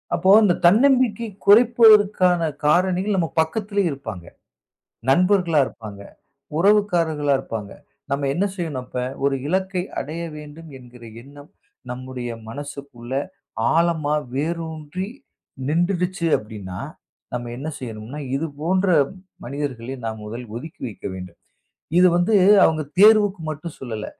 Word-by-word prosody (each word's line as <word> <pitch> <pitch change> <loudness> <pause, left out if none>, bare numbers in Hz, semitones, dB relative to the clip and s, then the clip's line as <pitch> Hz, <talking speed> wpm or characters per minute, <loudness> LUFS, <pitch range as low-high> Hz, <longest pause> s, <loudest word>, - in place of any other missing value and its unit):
அப்போ, 190 - +1
அந்தத் 180 -4 +2
தன்னம்பிக்கையைக் 230 -2 +2
குறைப்பதற்கான 210 -5 +6 0.2
காரணிகள் 185 +5 +2
நம்ம 165 -4 0
பக்கத்திலே 200 +4 -1
இருப்பாங்க. 115 - -7 0.9
நண்பர்களா 180 0 +3
இருப்பாங்க, 105 -3 -10 0.6
உறவுக்காரர்களா 170 -7 +2
இருப்பாங்க. 105 -3 -6 0.4
நம்ம 140 0 0
என்ன 180 +7 0
செய்யணும், 155 -8 -4
அப்ப 125 - -5 0.2
ஒரு 140 -1 +2
இலக்கை 190 +1 -1 0.2
அடைய 155 +5 -5 0.2
வேண்டும் 150 +2 -11
என்கிற 125 -1 -15 0.2
எண்ணம் 145 +3 -15 0.4
நம்முடைய 125 -1 -6 0.2
மனசுக்குள்ள 140 -2 -8 0.6
ஆழமா 165 -3 +1 0.2
வேரூன்றி 160 +3 -4 0.6
நின்றுடுச்சி 175 +2 0
அப்படின்னா, 100 -4 -8 0.5
நம்ம 120 -1 -4
என்ன 140 +4 -6
செய்யணும்னா 115 +3 -7 0.2
இது 155 - -1 0.2
போன்ற 185 +4 +1 0.6
மனிதர்களை 135 -2 -5
நாம் 110 -1 -5
முதலில் 115 +1 -8
ஒதுக்கி 155 +6 -9
வைக்க 105 - -11
வேண்டும். 90 -2 -9 0.6
இது 180 - +7
வந்து 175 +5 +1 0.3
அவங்க 155 -1 +1 0.2
தேர்வுக்கு 210 -3 +6
மட்டும் 155 +1 -6
சொல்லல. 110 -4 -5
155 Hz, 110 wpm, -22 LUFS, 130-185 Hz, 0.9 s, இது